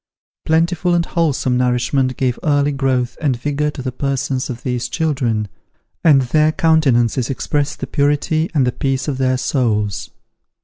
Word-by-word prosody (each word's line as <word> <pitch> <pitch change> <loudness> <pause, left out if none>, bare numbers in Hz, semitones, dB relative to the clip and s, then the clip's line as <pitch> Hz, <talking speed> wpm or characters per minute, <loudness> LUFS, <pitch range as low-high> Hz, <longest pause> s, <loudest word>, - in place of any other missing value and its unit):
Plentiful 170 +2 +2
and 170 -1 +1
wholesome 145 -8 0
nourishment 125 +1 0
gave 125 -2 -1
early 145 -1 +2
growth 130 -3 -1
and 135 -6 0
vigour 145 +2 -1
to 145 -3 -7
the 130 - -3
persons 135 0 -2
of 120 -2 -6
these 125 -1 -2
children, 130 -10 -1 0.6
and 145 -5 +5
their 155 +5 +2
countenances 135 -8 +2
expressed 145 +2 -2
the - - -1
purity 145 +4 0
and 135 -4 +3
the 125 - +1
peace 135 +2 -2
of 135 -3 -2
their 130 -1 +2
souls. 105 -8 -1
135 Hz, 150 wpm, -18 LUFS, 125-150 Hz, 0.6 s, and